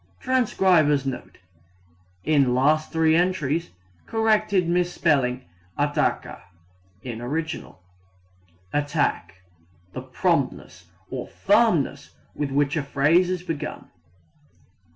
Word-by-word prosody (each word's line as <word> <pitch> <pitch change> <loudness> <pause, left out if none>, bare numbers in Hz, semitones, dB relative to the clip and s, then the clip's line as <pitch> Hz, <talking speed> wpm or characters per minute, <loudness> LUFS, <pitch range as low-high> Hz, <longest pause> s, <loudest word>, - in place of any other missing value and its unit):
[Transcriber's 185 - +2
Note: 130 -2 -6 0.9
In 140 -4 +3
last 155 +4 +2
3 160 -1 +3
entries, 170 -2 0 0.4
corrected 215 -5 +2
misspelling 160 -8 +1 0.3
"attaca" - - -1 0.6
in 120 -2 -6
original.] 150 - -5 0.9
Attack 145 - -1 0.5
the - - -5
promptness 90 - -2 0.3
or 130 -2 -5
firmness 195 - +1 0.2
with 145 -2 -3
which 140 +1 +1
a 155 - 0
phrase 145 +6 +2
is 180 -1 -2
begun. 155 -4 -6
155 Hz, 90 wpm, -24 LUFS, 135-180 Hz, 0.9 s, In